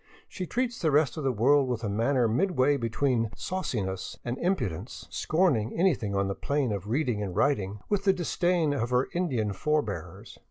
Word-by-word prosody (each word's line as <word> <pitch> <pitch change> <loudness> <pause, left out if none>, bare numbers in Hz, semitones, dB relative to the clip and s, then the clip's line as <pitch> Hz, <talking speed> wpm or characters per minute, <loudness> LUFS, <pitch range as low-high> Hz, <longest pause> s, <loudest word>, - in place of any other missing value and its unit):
She 185 -2 -6
treats 245 +2 -2
the 160 - +2
rest 150 -1 +3
of 155 - -4
the 135 - +2
world 135 +5 +3
with 120 -2 -2
a - - -1
manner 115 +4 +2
midway 145 - +2
be 115 -4 -2
tween 120 -2 +1
sauciness 105 - -3
and 120 0 -2
impudence, 170 - -2
scorning 155 - +1
anything 130 - +1
on 100 0 +1
the 100 - -1
plane 140 +2 -1
of 100 -1 -4
reading 120 -3 0
and 95 -3 -4
writing 105 -5 0
with 205 -1 0
the 195 - +6
disdain 175 -3 +1
of 120 -4 -1
her 125 +1 +1
Indian 125 - 0
forebears. 150 +8 -3
130 Hz, 185 wpm, -28 LUFS, 110-160 Hz, -, the